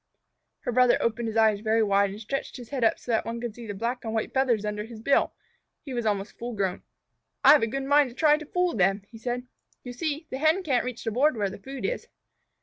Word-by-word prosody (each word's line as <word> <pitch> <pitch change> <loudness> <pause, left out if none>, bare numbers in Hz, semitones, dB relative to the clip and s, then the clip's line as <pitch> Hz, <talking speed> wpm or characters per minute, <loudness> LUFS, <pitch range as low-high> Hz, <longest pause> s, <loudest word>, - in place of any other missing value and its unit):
Her - - -2
brother 250 0 +5
opened 230 0 -1
his 225 0 -3
eyes 220 -2 +4
very 220 +1 +2
wide, 200 -1 +3
and 200 +2 -8
stretched 250 +7 -4
his 245 -2 -10
head 270 -4 -2
up 225 - +3
so 245 - -6
that 225 - +2
one 230 +1 -4
could 235 -2 -4
see 235 0 -10
the 205 - -5
black 235 +5 -3
and 225 -1 -3
white 220 - -2
feathers 245 -6 +2
under 210 0 -2
his 225 0 -10
bill. 275 +5 +2 0.5
He 275 - -7
was 240 -2 -1
almost 205 0 -2
full 240 +1 -4
grown. 190 -2 -1 0.6
"I've 295 - +8
a 225 - +2
good 270 +4 -3
mind 285 0 +4
to 240 - -14
try 300 +1 +4
to 310 - -8
fool 360 +1 +1
them," 195 0 +2
he 225 - -11
said. 245 +1 -3 0.4
"You 245 - -7
see, 305 +4 -3
the 260 - -3
Hen 315 +5 +3
can't 260 -8 +1
reach 250 -2 -5
the 225 - -2
board 260 +3 +2
where 200 -2 0
the - - -9
food 270 +5 -6
is." - - -3
235 Hz, 250 wpm, -27 LUFS, 215-270 Hz, 0.6 s, I've